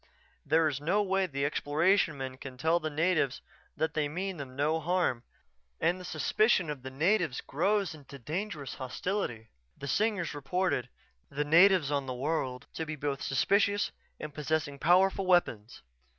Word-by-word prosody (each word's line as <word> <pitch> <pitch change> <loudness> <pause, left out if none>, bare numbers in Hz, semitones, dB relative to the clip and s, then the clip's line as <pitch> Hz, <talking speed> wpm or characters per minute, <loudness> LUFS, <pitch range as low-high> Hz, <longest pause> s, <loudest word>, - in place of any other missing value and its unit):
There 160 +2 +3
is 140 -2 -3
no 190 +7 +2
way 195 -1 +1
the 140 -3 -2
Exploration 155 +3 +2
men 130 -1 -5
can 130 -1 -9
tell 160 +6 +2
the 155 - -3
natives 155 -3 0 0.3
that 160 -1 0
they 155 -1 0
mean 185 +4 -3
them 135 -3 -8
no 150 +4 +1
harm 170 -7 0 0.6
and 175 +2 +1
the - - -9
suspicion 185 -2 +1
of 145 -3 -6
the 130 - -6
natives 160 +1 +1
grows 195 +5 0
into 145 -2 -12
dangerous 150 - -4
hostility. 130 - -3 0.3
The 140 - -7
Singers 200 - 0
reported 145 -2 -1 0.4
the 145 +1 -2
natives 170 -1 +5
on 140 -2 -1
that 130 - -3
world 130 -2 -2
to 160 - -3
be 155 - -4
both 140 -2 -3
suspicious 200 - +2 0.3
and 150 -1 -7
possessing 150 -1 -2
powerful 190 +3 +3
weapons. 120 - +1
155 Hz, 160 wpm, -30 LUFS, 140-185 Hz, 0.6 s, natives